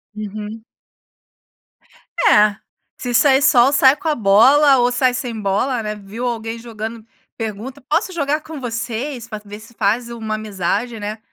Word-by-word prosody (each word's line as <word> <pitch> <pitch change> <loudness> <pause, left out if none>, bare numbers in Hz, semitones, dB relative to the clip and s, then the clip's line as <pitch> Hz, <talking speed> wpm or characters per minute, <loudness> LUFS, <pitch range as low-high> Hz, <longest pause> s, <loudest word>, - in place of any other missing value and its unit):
Uhum. 215 +1 -7 1.6
É. 210 0 +5 0.4
Se 245 -1 -4
sair 270 +1 +5
sol, 255 -1 +5
sai 270 -1 +6
com 325 - -7
a 310 - +3
bola 265 +7 +5
ou 245 0 +2
sai 250 0 +2
sem 245 -3 -4
bola, 210 +6 0
né? 215 -1 -4
Viu 210 +4 -7
alguém 230 -1 -4
jogando, 225 -1 -7 0.3
pergunta: 225 +5 -6
"Posso 335 +6 +1
jogar 300 -2 -1
com 315 0 -9
vocês?". 240 +1 -4
Pra 215 -2 -6
ver 205 0 -10
se 230 +2 -16
faz 230 +3 0
uma 220 -2 -4
amizade, 215 +2 -3
né? 210 +1 -5
230 Hz, 155 wpm, -19 LUFS, 215-260 Hz, 1.6 s, sai